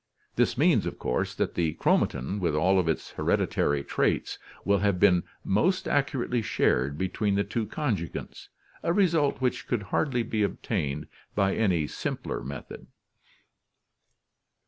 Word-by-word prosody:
This - - +2
means - - +3
of - - -5
course 60 - -1
that - - -1
the 80 -3 0
chromatin, 80 +12 +1
with 85 -5 0
all 95 +5 +3
of 90 - 0
its 80 - -1
hereditary 70 -1 +1
traits, - - 0 0.3
will 100 0 +3
have 100 -2 +1
been 90 -3 +5 0.2
most 180 - +1
accurately 135 -4 0
shared 70 - +1
between 100 +3 0
the 100 - +2
two 110 0 -3
con 130 -1 0
jugants, 85 -2 -7 0.3
a 170 - +1
result 165 -9 +2
which 125 -1 -1
could 120 -5 -1
hardly 130 -6 +1
be 110 -1 -2
obtained 75 -8 -1 0.3
by 100 -1 +2
any 90 -8 +2
simpler - - -4
method. 65 0 -8
100 Hz, 145 wpm, -27 LUFS, 80-120 Hz, 0.3 s, been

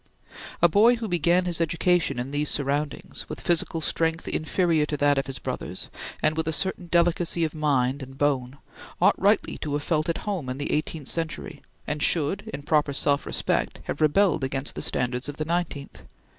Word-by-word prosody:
A - - +10
boy 215 +8 +5
who 230 -1 -4
began 175 0 +2
his 170 -2 0
education 165 -1 +1
in 125 +3 -3
these 145 +1 0
surroundings, 145 +1 -1
with - - -6
physical 165 -1 0
strength 165 +1 0
inferior 160 0 +1
to 150 - -2
that 145 -1 +3
of 135 - -3
his 135 -1 -4
brothers, - - -5 0.3
and 155 +1 +3
with 160 0 -1
a - - +1
certain 185 +1 -1
delicacy 170 0 +2
of 155 - -1
mind 140 -3 +1
and 135 0 -9
bone, 135 -2 0 0.4
ought - - +5
rightly - - +2
to 150 - -3
have 145 0 -1
felt 155 0 0
at 165 - 0
home 185 -11 -2
in 130 - -3
the 145 - -3
eighteenth 155 -2 -2
century 160 -2 -4 0.2
and 150 0 -3
should, 170 +6 +1
in 140 0 -6
proper 150 -2 +2
self 140 +1 0
respect, - - -1
have 145 - -5
rebelled 160 0 +3
against 135 +1 -2
the - - -5
standards 125 +2 -1
of 145 - -7
the 155 - -2
nineteenth. 165 -4 -3
155 Hz, 190 wpm, -25 LUFS, 140-170 Hz, 0.4 s, A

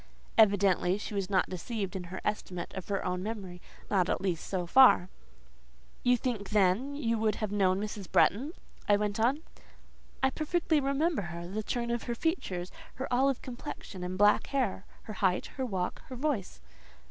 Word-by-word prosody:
Evidently 200 -4 +4
she 210 - -6
was 195 -2 -2
not 190 -2 +2
deceived 195 +2 -4
in 185 -2 -4
her 185 +2 -6
estimate 180 -4 -3
of 190 - -6
her 200 -1 -2
own 180 0 -1
memory; 190 -4 -6 0.3
not, 185 -3 +3
at - - +1
least, 180 -4 -2
so 185 -2 -2
far. 220 -3 +6 0.9
"You 245 0 +4
think, 225 -5 -3
then, 210 +7 +2
you 230 -6 0
would 215 -1 +1
have 215 -2 -3
known 190 -2 +2
Mrs. 205 -2 -5
Bretton?" 270 - +3 0.4
I 205 - +6
went 210 +1 -1
on. 265 +8 +2 0.8
"I 265 - +4
perfectly 315 +1 +1
remembered 280 - 0
her; 170 0 -6
the 205 +4 -3
turn 235 +2 -2
of 235 -1 -1
her 235 - -2
features, 195 - -2 0.2
her 260 - -4
olive 265 +1 +2
complexion, 240 -6 -7
and 180 +1 -4
black 205 +1 +4
hair, 250 -8 -1 0.2
her 215 - -7
height, 185 -2 +1
her 265 - -1
walk, 185 -5 -3
her 255 - -7
voice." 245 - -2
210 Hz, 175 wpm, -30 LUFS, 185-245 Hz, 0.9 s, far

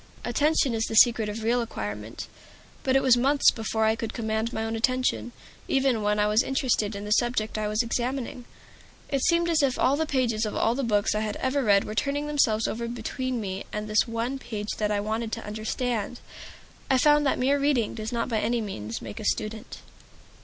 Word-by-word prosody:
Attention 285 +1 +2
is 225 0 0
the 225 - -4
secret 225 -1 +5
of 215 +1 -5
real 240 +2 +2
acquirement; 105 - -5 0.6
but 265 -2 +1
it 270 - +4
was 255 -2 +6
months 275 +4 +4
before 220 -1 -1
I 220 0 +3
could 225 0 -5
command 220 0 -1
my 220 -2 -3
own 225 0 -2
attention, 255 +1 0 0.4
even 265 -4 +2
when 210 0 +1
I 210 - +3
was 210 +2 +3
interested 250 -6 0
in 200 +1 -6
the 210 - -5
subject 235 -1 +1
I 215 -1 -1
was 215 +3 +1
examining. 245 +1 -3 0.6
It 275 -1 0
seemed 340 +2 +2
as 330 -3 +2
if 270 -3 +1
all 275 - +3
the 315 +2 -1
pages 240 -6 0
of 215 - -2
all 225 - +2
the 270 - -2
books 210 -4 +1
I 210 - 0
had 215 -1 -2
ever 265 +2 0
read 200 -3 +4
were 215 - -6
turning 280 +6 -1
themselves 235 -7 +2
over 235 +1 -3
between 245 +2 -3
me 195 -2 -4
and 210 0 -4
this 215 +2 +2
one 235 +4 -3
page 210 -4 -6
that 210 -1 +1
I 205 -1 0
wanted 220 +2 -2
to - - -4
understand. 220 +2 -3 0.7
I 265 - +4
found 295 +3 +4
that - - +1
mere 275 +3 +2
reading 275 -6 +1
does 220 0 -5
not 235 -1 -1
by 225 -3 0
any 235 +3 0
means 115 - -5
make 105 -3 -7
a - - -6
student. 215 +1 -3
230 Hz, 210 wpm, -26 LUFS, 215-260 Hz, 0.7 s, was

